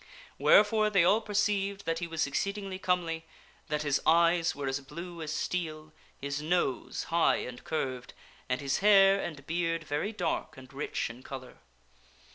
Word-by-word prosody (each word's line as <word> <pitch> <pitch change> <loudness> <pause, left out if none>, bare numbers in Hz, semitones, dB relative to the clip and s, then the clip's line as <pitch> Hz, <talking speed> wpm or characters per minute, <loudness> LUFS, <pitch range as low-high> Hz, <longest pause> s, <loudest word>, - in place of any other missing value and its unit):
Wherefore 215 +1 +5
they 195 -4 +4
all 205 +6 +4
perceived 200 -2 0
that 165 0 -1
he 170 - -3
was 160 -1 -1
exceedingly 195 +6 -3
comely, 170 -3 0 0.4
that 150 0 -1
his 145 -2 +1
eyes 170 +1 +4
were 140 -1 -4
as 135 +1 -1
blue 170 +5 -8
as 155 -1 -4
steel, 155 -1 -3 0.3
his 140 +1 -3
nose 155 -5 -1
high 170 - +4
and 125 -1 -6
curved, 130 -5 -3 0.3
and 125 +2 0
his 135 -1 0
hair 195 -1 +6
and 145 -4 -6
beard 165 0 -1
very 150 +8 -2
dark 180 -10 -3
and 130 +1 -13
rich 135 -3 -3
in 120 +2 -13
color. 130 -1 -9
165 Hz, 160 wpm, -30 LUFS, 145-190 Hz, 0.4 s, hair